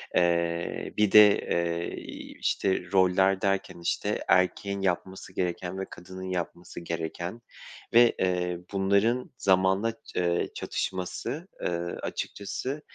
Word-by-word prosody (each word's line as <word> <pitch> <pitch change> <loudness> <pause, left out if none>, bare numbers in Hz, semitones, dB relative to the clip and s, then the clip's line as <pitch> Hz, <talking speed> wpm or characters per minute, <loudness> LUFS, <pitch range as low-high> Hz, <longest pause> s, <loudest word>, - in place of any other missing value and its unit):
Eee, 85 -1 +1
bir 105 -2 +3
de, 105 -1 +10
eee, 85 0 -1
iii, - - -9
işte, 95 -2 0
roller 95 +1 +4
derken, 100 -3 -1
işte, 85 - -1
erkeğin 100 +2 +2
yapması 95 0 -2
gereken 90 +1 -2
ve 95 - -2
kadının 95 +1 -8
yapması 90 -1 -4
gereken 85 +5 -4 0.5
ve, 120 0 +6
eee, 90 -1 0
bunların 100 +6 +2
zamanla, 95 +3 +3 0.2
ııı, 85 -1 +1
çatışması, 95 - -3
ııı, 85 0 -2
açıkçası, 130 +8 -4
95 Hz, 110 wpm, -28 LUFS, 85-100 Hz, 0.5 s, de